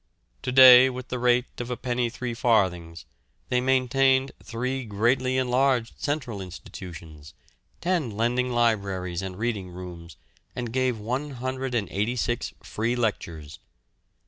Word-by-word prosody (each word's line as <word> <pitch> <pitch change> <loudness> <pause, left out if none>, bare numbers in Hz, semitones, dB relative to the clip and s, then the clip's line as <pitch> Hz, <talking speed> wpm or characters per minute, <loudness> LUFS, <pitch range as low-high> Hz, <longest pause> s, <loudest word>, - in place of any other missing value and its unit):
To 130 - -3
day, 130 0 +9
with 130 0 -7
the 125 - -3
rate 125 0 +3 0.2
of 120 - -6
a 125 - -3
penny 120 -1 -1
three 125 0 -5
farthings, 95 -8 0 0.4
they 125 0 +2
maintained 130 +1 +2
three 130 +3 -3
greatly 125 +4 +1
enlarged 130 -1 +1
central 135 -9 -2
institutions, 85 -5 -10 0.5
ten 170 -7 0
lending 120 +4 0
libraries 100 -7 0
and 95 -1 -6
reading 105 -4 -2
rooms, 90 -2 -10 0.4
and 120 -2 -4
gave 130 -2 +1
186 125 -2 -2
free 115 +3 -2
lectures. 85 -10 -3
120 Hz, 120 wpm, -26 LUFS, 100-130 Hz, 0.5 s, day